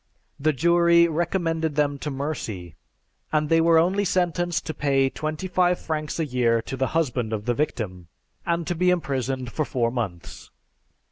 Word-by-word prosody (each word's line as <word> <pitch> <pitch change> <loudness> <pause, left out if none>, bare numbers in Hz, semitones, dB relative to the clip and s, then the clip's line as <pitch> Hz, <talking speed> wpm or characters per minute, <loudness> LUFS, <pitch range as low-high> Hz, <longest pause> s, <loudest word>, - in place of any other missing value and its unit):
The 155 +2 +2
jury 170 +3 +4
recommended 165 -2 -1
them 145 -1 +1
to 150 - -4
mercy, 125 - -4 0.6
and 150 -1 +1
they 165 0 +4
were 165 0 +5
only 185 +5 +3
sentenced 175 -2 0
to 160 - -3
pay 135 -2 +1
twenty 155 +4 -4
five 180 -1 +2
francs 155 0 -4
a 160 - +1
year 120 -4 +2
to 135 - -5
the 130 0 0
husband 125 -8 0
of 105 -1 -3
the 120 - +1
victim, 100 - -3 0.4
and 170 0 -1
to 175 - -1
be 180 +2 +2
imprisoned 135 -7 -1
for 155 - -1
four 120 -4 -1
months. 105 -9 -5
155 Hz, 165 wpm, -24 LUFS, 125-170 Hz, 0.6 s, were